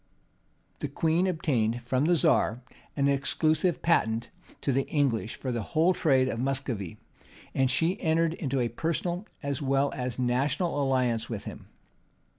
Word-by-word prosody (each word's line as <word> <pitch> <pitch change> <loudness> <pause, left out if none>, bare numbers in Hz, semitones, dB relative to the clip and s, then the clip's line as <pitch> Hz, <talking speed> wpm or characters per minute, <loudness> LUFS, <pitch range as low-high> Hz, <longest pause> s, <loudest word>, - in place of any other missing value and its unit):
The - - -2
queen 165 +3 +1
obtained 120 -9 0
from 130 +4 +1
the 175 +2 +4
czar 150 -8 +2 0.4
an 140 0 +3
exclusive 155 +5 +1
patent 115 -8 +1 0.3
to 140 - 0
the 135 +1 0
English 125 -7 0
for 130 - -4
the 120 -2 -2
whole 165 - +2
trade 135 -6 +3
of 115 - -3
Muscovy;[*] 130 - -2 0.6
and 135 -1 +2
she 165 +8 +1
entered 165 -1 +2
into 140 -5 -2
a 120 - +1
personal 170 - -2 0.2
as 140 +1 -2
well 135 0 +1
as 125 -2 -3
national 140 +6 0
alliance 125 -4 +1
with 110 -4 -5
him. - - -9
135 Hz, 150 wpm, -28 LUFS, 125-160 Hz, 0.6 s, the